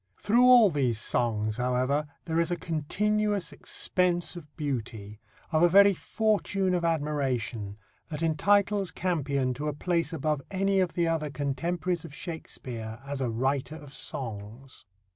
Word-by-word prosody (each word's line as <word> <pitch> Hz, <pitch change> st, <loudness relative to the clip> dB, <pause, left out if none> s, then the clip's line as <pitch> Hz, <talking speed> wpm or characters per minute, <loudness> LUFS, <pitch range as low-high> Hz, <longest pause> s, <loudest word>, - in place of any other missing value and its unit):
Through 235 Hz, +4 st, +3 dB
all 240 Hz, -6 st, +7 dB
these 130 Hz, -7 st, +1 dB
songs, 110 Hz, -2 st, 0 dB
however, 130 Hz, +4 st, 0 dB, 0.2 s
there 165 Hz, 0 st, 0 dB
is 170 Hz, -, +1 dB
a 175 Hz, -, 0 dB
continuous 200 Hz, +3 st, -1 dB
expense 175 Hz, +3 st, 0 dB
of 170 Hz, -4 st, -9 dB
beauty, 115 Hz, -8 st, -4 dB, 0.3 s
of 155 Hz, -1 st, +2 dB
a 175 Hz, -, +6 dB
very 200 Hz, +2 st, +7 dB
fortune 200 Hz, -2 st, 0 dB
of 175 Hz, -1 st, 0 dB
admiration, 135 Hz, -10 st, -1 dB, 0.3 s
that 155 Hz, 0 st, -5 dB
entitles 200 Hz, +4 st, +2 dB
Campion 140 Hz, -7 st, -1 dB
to 145 Hz, +4 st, -4 dB
a 150 Hz, -, -1 dB
place 170 Hz, +2 st, 0 dB
above 155 Hz, -2 st, -1 dB
any 195 Hz, 0 st, +1 dB
of 180 Hz, -3 st, 0 dB
the 170 Hz, -1 st, +1 dB
other 160 Hz, -2 st, -1 dB
contemporaries 165 Hz, +6 st, -2 dB
of 155 Hz, -3 st, -10 dB
Shakespeare 120 Hz, -10 st, -6 dB
as 140 Hz, -1 st, -4 dB
a 125 Hz, -, 0 dB
writer 135 Hz, +6 st, -1 dB
of 145 Hz, -3 st, -11 dB
songs. 115 Hz, +1 st, -7 dB
150 Hz, 145 wpm, -28 LUFS, 130-180 Hz, 0.3 s, all